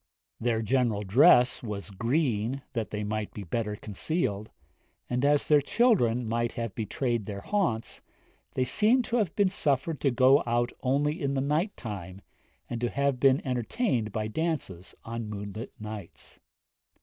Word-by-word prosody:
Their 115 -1 0
general 115 -3 +1
dress 125 - +5
was 105 -3 -6
green, 120 - 0
that 115 -4 -2
they 105 0 -3
might 105 0 -3
be 105 - -5
the 85 - -16
better 105 -1 -1
concealed; 105 - -2 0.6
and, 125 +1 -1
as 145 0 +3
their 150 -1 +5
children 130 - +2
might 115 +1 -1
have 115 -4 -4
betrayed 115 +1 -2
their 100 -1 -5
haunts, 175 - -1 0.5
they 130 - +2
seem 215 - +4
to 235 +1 -1
have 205 -8 0
been 200 -2 +3
suffered 150 -3 0
to 140 - +3
go 130 +3 +5
out 120 +1 +1
only 145 +6 0
in 140 -1 -1
the - - +1
night 150 +9 0
time, 100 -4 -7 0.5
and 120 -1 -5
to 120 - +1
have 140 0 0
been 135 +1 +3
entertained 125 - -1
by 110 0 -2
dances 110 - -3
on 115 -1 -5
moonlight 105 +3 -6
nights. 105 -4 -9
120 Hz, 160 wpm, -28 LUFS, 110-140 Hz, 0.6 s, dress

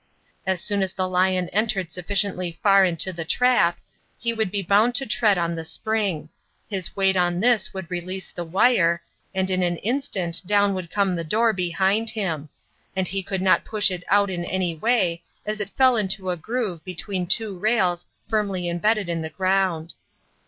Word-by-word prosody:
As 190 -2 0
soon 200 -1 0
as 190 -2 -1
the 185 -1 -1
lion 185 0 +1
entered 200 -4 0
sufficiently 185 -1 -2
far 195 -1 +6
into 180 0 +1
the 170 -1 -4
trap, 175 -3 +3 0.4
he 235 0 -1
would 220 -3 -1
be 200 +1 -2
bound 210 +6 +3
to 270 - +1
tread 210 -4 +2
on 170 -1 0
the 165 -1 -4
spring; 195 -4 -2 0.4
his 190 -4 -3
weight 195 -1 +2
on 175 -1 +1
this 240 +1 +3
would 190 -1 -6
release 185 +2 -4
the 175 - -5
wire, 170 -1 +3 0.3
and 190 0 0
in 185 0 +1
an 175 -1 +1
instant 200 -8 -1
down 205 0 +3
would 185 -3 -5
come 195 -1 +1
the 165 - -3
door 220 +7 +2
behind 190 +4 +1
him; 170 -9 -3 0.5
and 190 -2 -1
he 195 +1 -2
could 190 0 -3
not 185 - +4
push 210 -3 +1
it 180 -1 -4
out 200 0 +3
in 175 -1 -3
any 180 -1 -1
way, 180 -2 +1 0.2
as 215 0 -3
it 205 -2 -3
fell 260 +2 +4
into 190 -3 -1
a - - -1
groove 190 -2 -3
between 185 +1 -4
two 215 0 0
rails 185 -5 +1 0.2
firmly 200 -5 -1
embedded 200 +4 +1
in 170 -1 -2
the 160 - -4
ground. 185 -3 0
190 Hz, 185 wpm, -24 LUFS, 175-210 Hz, 0.5 s, far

